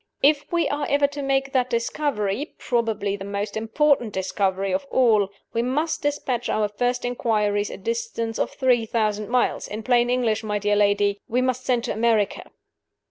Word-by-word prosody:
If 290 +1 +3
we 340 -1 +2
are 290 0 -2
ever 285 0 +3
to 285 0 -3
make 270 0 0
that 255 -1 +2
discovery 235 0 -1
probably 220 -4 -1
the 195 - -8
most 200 +1 -4
important 235 +1 +1
discovery 190 0 -1
of 190 +9 -2
all 220 -6 +3 0.2
we 230 - +1
must 295 +7 -1
dispatch 260 -4 -1
our 215 -1 +1
first 245 +4 -1
inquiries 210 -4 0
a - - -7
distance 460 - -3
of - - +1
three 245 -4 +1
thousand 215 -2 -1
miles. 250 0 +1
In 215 +2 -6
plain 240 0 +3
English, 235 -3 +1
my 210 -1 -1
dear 205 0 +1
lady, 205 0 +2
we 245 - 0
must 255 0 -1
send 245 -2 +2
to 245 - -2
America." 220 -2 +1
235 Hz, 175 wpm, -24 LUFS, 210-260 Hz, 0.2 s, If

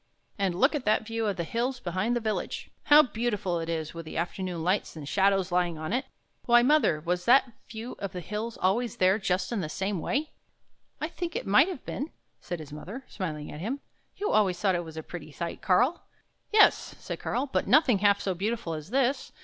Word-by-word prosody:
" - - -38
And 190 -3 +1
look 270 +8 +4
at 295 -4 -2
that 215 +1 +2
view 225 0 -2
of 200 -3 -1
the 170 - -1
hills 245 +8 -2
behind 185 +5 -1
the - - +1
village! 220 -2 -3
How 300 +1 +8
beautiful 215 - -1
it 165 0 -4
is 160 -2 -3
with 165 0 -6
the 155 - -7
afternoon 175 0 -3
lights 185 +1 0
and 150 -3 -8
shadows 195 0 +2
lying 175 -2 +1
on 155 +4 -4
it! 260 +2 0 0.4
Why, 240 0 +6
mother, 270 - +4
was 180 +2 -1
that 250 +1 +5 0.2
view 230 +2 -7
of 200 -2 -4
the 180 - -5
hills 215 +6 -4
always 220 +5 +1
there 190 +3 +4
just 185 +1 -1
in 225 -4 -1
the 155 - -4
same 190 +3 -2
way? 285 - -1 0.2
" - - -45
" - - -45
I 305 - -1
think 340 0 -5
it - - -2
must 210 - +5
have 365 -9 -6
been," 285 +4 -4 0.3
said 175 - -5
his 150 -2 -9
mother, 210 - -8
smiling 155 -6 -5
at 150 - -8
him. 235 - -3 0.4
"You 415 - -2
always 190 -5 +3
thought 190 0 +2
it 175 -1 -1
was 160 -1 -10
a 160 - -4
pretty 155 -2 -8
sight, 170 +4 -5
Karl." 245 - +3 0.5
"Yes," 425 0 +5
said - - -6
Karl, 255 +3 -1
" - - -31
but - - +1
nothing 260 -7 +5
half 200 0 +4
so 190 - -1
beautiful 205 -1 -2
as 155 +2 -6
this. 265 +2 +1
200 Hz, 230 wpm, -28 LUFS, 175-240 Hz, 0.5 s, How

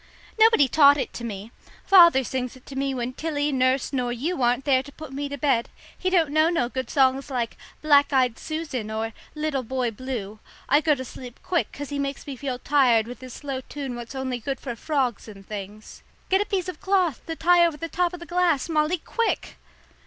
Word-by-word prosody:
"Nobody 445 -10 +6
taught 285 +1 +6
it 275 - -3
to 235 - -7
me. 215 -1 -6 0.3
Father 340 -8 +7
sings 255 0 -3
it 260 - -17
to 275 - -10
me 275 0 -1
when 250 -1 -3
Tilly, 295 0 -1
nurse, 260 +1 +1
nor 250 -2 0
you 275 +7 -2
aren't 245 +2 +2
there 265 -3 +4
to 285 - -12
put 305 -2 -10
me 285 +1 -3
to 285 - -5
bed. 265 -5 +1 0.3
He 370 - -1
don't 335 -6 +2
know 310 +2 +4
no 330 -9 0
good 260 0 -4
songs 270 0 +2
like 245 -4 -2 0.3
'Black 290 -2 +5
eyed 255 -4 +2
Susan' 305 -9 -4
or 220 +1 -3 0.2
'Little 300 -3 -1
Boy 255 0 -2
Blue.' 220 -3 -6 0.3
I 290 +3 +4
go 305 -2 +3
to 260 -1 -6
sleep 245 0 -10
quick 350 -2 0
'cause 285 0 -7
he 285 -1 -3
makes 275 0 -3
me 280 - -6
feel 260 -1 -4
tired 250 -5 +3
with 245 +2 -9
his 255 -1 -9
slow 275 -3 -5
tune 275 -3 -5
what's 240 +2 -8
only 260 -2 -3
good 270 +3 -4
for 245 -4 -5
frogs 260 -5 -1
and 195 -3 -12
things. 210 +1 -8 0.3
Get 385 +1 +3
a - - 0
piece 375 -3 -1
of 365 - -7
cloth 380 -7 +1
to 325 - -3
tie 350 +2 +4
over 335 -3 +1
the 330 - -4
top 350 +1 0
of 355 - -8
the 345 - -9
glass, 345 -6 +1
Molly, 310 +2 +1
quick!" 460 +7 -2
275 Hz, 220 wpm, -24 LUFS, 250-310 Hz, 0.3 s, Father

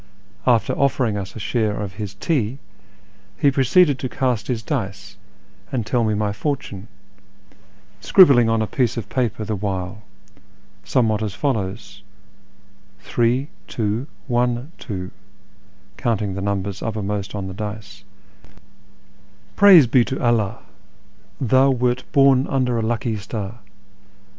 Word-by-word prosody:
After 120 -3 +3
offering 130 -5 +1
us 100 -2 -5
a - - -6
share 110 0 -1
of 100 -2 -5
his 100 -1 -6
tea, 130 - -1 0.8
he 145 -2 +3
proceeded 140 +2 +3
to 130 - -3
cast 125 -6 -1
his 115 -3 -2
dice 100 0 -4 0.6
and 120 -5 -2
tell 120 +1 +1
me 110 -1 +1
my 105 -1 -1
fortune, 105 -4 -4 1.1
scribbling 135 -11 +6
on 115 -1 +2
a - - 0
piece 120 +3 -1
of 105 -4 -5
paper 115 -4 -1
the 110 - -2
while, 95 0 -4 0.8
somewhat 110 -4 +1
as 105 -3 -3
follows: 105 -5 -3 0.4
— - - -33
" - - -33
Three, 125 +5 0 0.2
tioo, 110 +4 -2 0.2
one, 120 +3 0
two 95 -5 -6 0.4
" 100 0 -32
(counting 110 -6 -1
the 100 - -4
numbers 100 0 -2
uppermost 105 -2 -3
on 100 -2 -4
the 95 - -6
dice), 105 +1 -7 0.8
" - - -32
Praise 190 -8 +8
be 120 +1 +4
to 130 - -3
AlliUi! 115 -6 +1 0.8
thou 130 +2 +4
wert 125 -1 0
born 135 -2 +4
under 125 -3 0
a - - 0
lucky 115 0 -1
star. 105 +2 -6
115 Hz, 140 wpm, -21 LUFS, 100-125 Hz, 1.1 s, Praise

